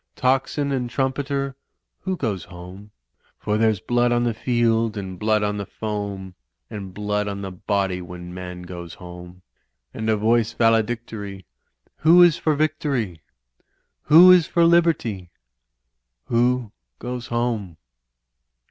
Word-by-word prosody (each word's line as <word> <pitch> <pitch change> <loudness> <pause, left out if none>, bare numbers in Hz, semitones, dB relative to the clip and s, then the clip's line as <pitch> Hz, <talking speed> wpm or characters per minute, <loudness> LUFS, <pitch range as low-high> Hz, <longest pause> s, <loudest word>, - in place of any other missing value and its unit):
Tocsin 135 +2 0
and 125 -3 -1
trumpeter! 135 +1 -2 0.4
Who 190 -1 -3
goes 105 - -3
home? 90 +3 -11 0.5
For 105 - -2
there's 110 -3 +2
blood 120 +5 +1
on 120 0 +2
the 120 -1 0
field 115 -1 +1
and 95 -2 -6
blood 110 0 +2
on 105 0 -1
the 100 - -4
foam, 100 -3 -5 0.4
And 100 -3 -7
blood 105 +1 -2
on 100 -1 -4
the 95 - -5
body 95 0 -1
when 90 0 -9
man 90 -1 -7
goes 85 -1 -8
home. 90 0 -11 0.5
And 110 0 -3
a 110 - +3
voice 115 +1 +2
valedictory 110 -4 -1 0.3
— - - -35
^Who 175 +3 +8
is 170 -3 +3
for 155 -2 0
Victory? 140 - -1 0.8
Who 175 +4 +9
is 180 -3 +5
for 170 -1 +3
Liberty? 160 - +2 1.0
Who 120 -1 +1 0.3
goes 125 -1 -6
home?" 115 -8 -2
110 Hz, 135 wpm, -23 LUFS, 95-125 Hz, 1.0 s, Who